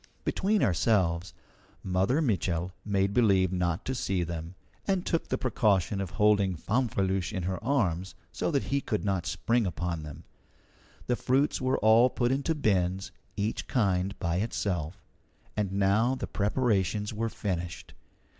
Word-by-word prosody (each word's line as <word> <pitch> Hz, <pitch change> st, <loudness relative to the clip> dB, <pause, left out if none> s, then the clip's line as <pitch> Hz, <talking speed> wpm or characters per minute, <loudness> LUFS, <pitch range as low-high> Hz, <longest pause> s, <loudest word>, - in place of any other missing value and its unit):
Between 205 Hz, +2 st, +1 dB
ourselves, 90 Hz, -4 st, +2 dB, 0.5 s
Mother 95 Hz, -, +1 dB
Mitchel 90 Hz, -, 0 dB
made 100 Hz, -1 st, +1 dB
believe 95 Hz, -6 st, +3 dB
not 90 Hz, -2 st, -1 dB
to 130 Hz, -, -1 dB
see 95 Hz, -8 st, -1 dB
them, 85 Hz, +1 st, -5 dB, 0.3 s
and 190 Hz, -2 st, +1 dB
took 165 Hz, -, 0 dB
the -, -, -1 dB
precaution 100 Hz, -6 st, +1 dB
of 95 Hz, -, -3 dB
holding 100 Hz, -2 st, +3 dB
Fanfreluche 95 Hz, -2 st, 0 dB
in 95 Hz, -4 st, -3 dB
her 95 Hz, +2 st, -3 dB
arms 95 Hz, -9 st, 0 dB, 0.2 s
so -, -, -2 dB
that 140 Hz, -5 st, +1 dB
he 140 Hz, +1 st, 0 dB
could 105 Hz, -5 st, -2 dB
not 95 Hz, -3 st, 0 dB
spring 115 Hz, +4 st, +1 dB
upon 85 Hz, -2 st, -3 dB
them. 75 Hz, -2 st, -9 dB, 0.8 s
The 125 Hz, -, +1 dB
fruits 135 Hz, +4 st, +1 dB
were 130 Hz, +1 st, +1 dB
all 115 Hz, +3 st, +5 dB
put 120 Hz, -1 st, 0 dB
into 140 Hz, +4 st, 0 dB
bins, 95 Hz, -8 st, 0 dB, 0.3 s
each 105 Hz, +2 st, -2 dB
kind 100 Hz, -4 st, +1 dB
by 85 Hz, -2 st, -1 dB
itself. 95 Hz, -4 st, -2 dB, 0.5 s
And 105 Hz, -3 st, -1 dB
now 100 Hz, +6 st, +2 dB
the 130 Hz, -, -4 dB
preparations 105 Hz, -2 st, 0 dB
were 115 Hz, +2 st, -1 dB
finished. 90 Hz, -5 st, -4 dB
100 Hz, 145 wpm, -29 LUFS, 90-120 Hz, 0.8 s, all